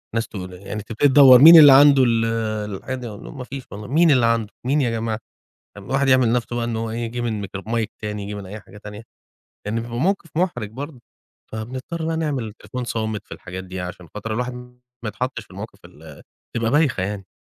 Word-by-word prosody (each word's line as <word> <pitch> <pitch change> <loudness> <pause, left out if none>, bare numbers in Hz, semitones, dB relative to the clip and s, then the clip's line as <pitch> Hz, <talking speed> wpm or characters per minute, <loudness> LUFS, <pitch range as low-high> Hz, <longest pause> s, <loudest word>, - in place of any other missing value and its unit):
ناس 115 0 -1
تقو 95 -5 -7
يعني 100 +3 -7
تبتدي 115 +6 +1
تدوّر 130 -2 +8
مين 165 +2 +11
اللي 145 -2 +10
عنده 140 -1 +7
ال 115 -2 +2 0.5
الحاجة 120 0 -6
مفيش 135 +3 -8
والله، 105 +1 -8
مين 160 +4 +4
اللي 125 -4 +4
عنده 115 -2 +1 0.2
مين 145 +4 +2
يا 125 - +1
جماعة؟ 110 -1 -2 0.6
طب 100 - -11
الواحد 135 +4 0
يعمل 130 -3 +4
نفسه 120 0 -1
بقى 120 - -1
إن 115 -1 -3
هو 115 0 -3
إيه 115 - -4
يجيب 120 +1 -4
الميكروف 100 -3 -5
mic 115 -1 0 0.2
تاني، 105 -1 -4
ييجي 100 +1 -6
من 100 -2 -7
أي 105 +3 -8
حاجة 105 - -15
تانية؟ 105 +1 -10 0.6
يعني 110 +2 -2
بيبقى 120 0 -6
موقف 185 +1 0
مُحرج 125 - -1
برضو. 140 +2 -8 0.5
فبنضطر 130 +9 -5
بقى 165 0 -1
نعمل 150 -6 -2
التليفون 110 +3 -7
صامت 110 -3 -3
في - - -8
الحاجات 95 +1 -8
دي 95 0 -7
عشان 90 -1 -8
خاطر 105 +1 -5
الواحد 125 +2 -2 0.5
ما - - -2
يتحطش 125 0 -4
في - - -31
المواقف 100 +2 -9
ال 80 -4 -14 0.3
بتبقى 115 -1 0
بايخة 145 -8 +2
يعني. 100 0 -4
115 Hz, 205 wpm, -21 LUFS, 105-130 Hz, 0.6 s, مين